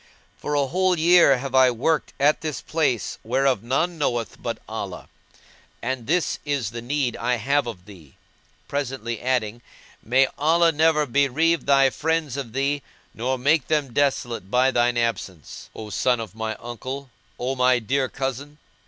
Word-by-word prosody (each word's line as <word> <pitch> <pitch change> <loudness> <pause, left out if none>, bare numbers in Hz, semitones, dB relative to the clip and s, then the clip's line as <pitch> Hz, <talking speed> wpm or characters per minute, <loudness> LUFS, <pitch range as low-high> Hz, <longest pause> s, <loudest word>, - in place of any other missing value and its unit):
For 150 - -3
a 140 -1 +2
whole 185 +5 +1
year 165 -4 +6
have 135 +1 -6
I 130 -1 +6
worked 140 +6 0
at 145 +2 +3
this 155 -4 -3
place 145 -8 -1
whereof 130 -1 +1
none 160 +8 -1
knoweth 120 -7 -2
but - - -3
Allah, - - -6 0.7
and 125 -1 -4
this 175 +3 0
is 140 -8 -2
the 115 0 -6
need 130 0 -1
I 125 +1 0
have 140 +4 0
of 95 -6 -7
thee;" 90 -9 -15 0.5
presently 125 -5 -3
adding, 120 -3 -1 0.4
"May 130 +4 +3
Allah 165 +3 +4
never 160 -1 +3
bereave 145 +4 +1
thy 135 -1 +5
friends 155 +1 -1
of 135 -6 -5
thee 140 +2 0 0.3
nor 130 +3 -2
make 145 +3 +2
them 145 -5 0
desolate 120 -8 0
by 125 +3 +3
thine 120 -1 +2
absence, 100 -8 -3
O 110 -1 -8
son 125 +5 +1
of 110 -4 -6
my 110 0 -4
uncle, 130 +3 -7 0.3
O 130 +2 -2
my 125 0 +4
dear 130 +3 -1
cousin!" 135 +2 -5
130 Hz, 160 wpm, -23 LUFS, 120-145 Hz, 0.7 s, year